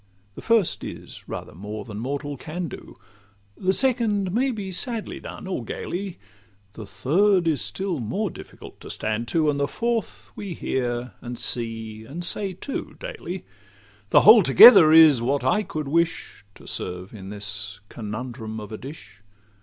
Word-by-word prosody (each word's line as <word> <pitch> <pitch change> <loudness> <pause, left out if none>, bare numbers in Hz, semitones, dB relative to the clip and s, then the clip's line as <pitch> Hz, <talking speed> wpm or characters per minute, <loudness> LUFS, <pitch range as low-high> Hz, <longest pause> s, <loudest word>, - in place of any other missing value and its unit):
The - - -10
first 225 -6 +2
is - - -9
rather - - -6
more 105 +4 -7
than 105 -2 -7
mortal 145 +4 -4
can 165 +6 -5
do; - - -10 0.6
The 185 - 0
second 215 -5 +1
may 250 +7 +1
be 205 -6 -4
sadly 225 +4 -3
done - - -9
or 185 -10 -3
gaily; 185 - -5 0.6
The 110 -2 -9
third 170 - +2
is 155 -3 +1
still 190 -5 -2
more 175 - -2
difficult - - -12
to - - -11
stand 110 +2 -2
to; 150 +4 +2
The 140 0 0
fourth 235 +6 -3
we 195 -5 -6
hear, 120 -1 -2
and 120 0 -6
see, 115 -2 -3
and 150 +10 -7
say 195 +2 0
too, 270 +9 -6
daily. 445 - -7 0.6
The - - +6
whole 215 +2 +9
together 155 - +9
is 155 -6 +8
what 140 +4 0
I 215 - +2
could 155 -7 -5
wish 165 - -1
To - - -16
serve 90 +2 -5
in 95 -3 -9
this 100 0 -5
conundrum 110 +1 -6
of 105 -1 -9
a 110 - -6
dish. 140 -4 -11
145 Hz, 160 wpm, -24 LUFS, -, 0.6 s, whole